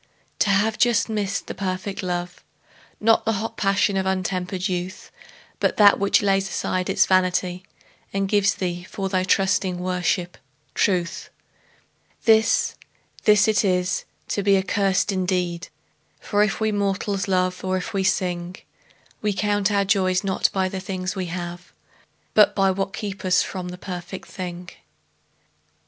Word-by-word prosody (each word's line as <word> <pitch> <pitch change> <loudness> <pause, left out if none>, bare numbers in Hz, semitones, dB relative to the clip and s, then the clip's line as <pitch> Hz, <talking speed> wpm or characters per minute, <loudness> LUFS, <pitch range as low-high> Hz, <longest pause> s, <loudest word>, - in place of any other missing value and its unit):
To 210 - +2
have 210 +3 +2
just 240 -2 +3
missed 205 -2 -2
the - - -6
perfect 190 +1 -4
love, 175 -1 -4 0.6
Not 225 +1 +4
the 225 - +1
hot 225 +3 -3
passion 200 0 +1
of 190 0 0
untempered 185 0 -1
youth, 180 0 -5 0.5
But - - +1
that 205 -1 +7
which 200 +1 +3
lays 195 -1 +2
aside 185 -1 -2
its 190 - +4
vanity 185 -1 +1 0.5
And 195 0 -1
gives 200 0 +2
thee, 175 -2 -3
for 195 -1 -3
thy 185 -1 +1
trusting 190 -1 +1
worship, 180 0 -1 0.3
truth— 180 -3 0 1.0
This, 220 -1 +4 0.5
this 210 -1 +5
it 220 0 +3
is 180 -1 0 0.2
to 205 - 0
be 200 0 +4
accursed 195 +1 +1
indeed; 180 -2 -1 0.5
For 205 -1 0
if 210 -1 +1
we 220 0 +1
mortals 200 -1 -1
love, 185 -1 0
or 185 0 0
if 205 +5 -5
we 195 -1 0
sing, 180 -2 -1 0.7
We 210 -1 0
count 205 +1 +1
our 200 -1 +2
joys 190 -2 +2
not 190 -1 +1
by 190 -1 0
the 190 0 -4
things 185 0 -4
we 185 -2 -3
have, 175 +1 -6 0.6
But 210 - +5
by 195 -1 +3
what 195 +1 -2
kept 200 -3 -5
us 185 -1 +3
from 185 -2 -5
the 180 0 -7
perfect 180 0 -7
thing. 180 -2 -7
190 Hz, 150 wpm, -23 LUFS, 185-200 Hz, 1.0 s, that